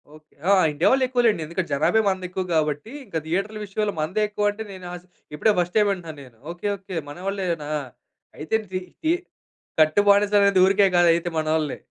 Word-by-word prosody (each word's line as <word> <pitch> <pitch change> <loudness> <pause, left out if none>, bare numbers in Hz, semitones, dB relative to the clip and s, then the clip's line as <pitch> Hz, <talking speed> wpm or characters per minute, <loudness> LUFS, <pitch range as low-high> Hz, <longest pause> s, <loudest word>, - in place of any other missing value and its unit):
Okay. 155 0 -20 0.2
ఆ! - - +6 0.2
India 150 +4 +2
వాళ్ళు 265 0 +3
ఎక్కువలెండి. 240 -9 +2
ఎందుకంటే 170 +3 -4
జనాభా 155 +10 +3
మనది 190 -1 -1
ఎక్కువ 185 +1 -3
కాబట్టి 150 +6 -1
ఇంక 180 -6 -4
థియేటర్లు 195 +6 -2
విషయంలో 205 +1 -2
మనదే 185 +8 -1
ఎక్కువంటే 210 +1 -1
నేను 185 -1 -10
ఆశ్ 180 0 -9 0.3
ఇప్పుడే 215 +8 +3
ఫస్ట్ 175 0 -2
టైం 210 - +4
వింటున్నాను 165 -6 -4
నేను. 125 -4 -17
ఓకే. 175 +4 -5
ఓకే. 190 -1 -9
మనవాళ్ళేనా! 180 -2 -3 0.7
అయితే 155 +8 -2 0.2
తి 185 - -1 0.2
తి 315 - +2 0.7
కట్టు 155 +6 +4
బానిసనేది 200 -1 +4
ఊరికే 195 +1 +4
కాదు 175 0 +5
అయితే 170 +1 -2
మనోళ్ళని. 155 -2 -1
185 Hz, 170 wpm, -23 LUFS, 160-205 Hz, 0.7 s, ఆ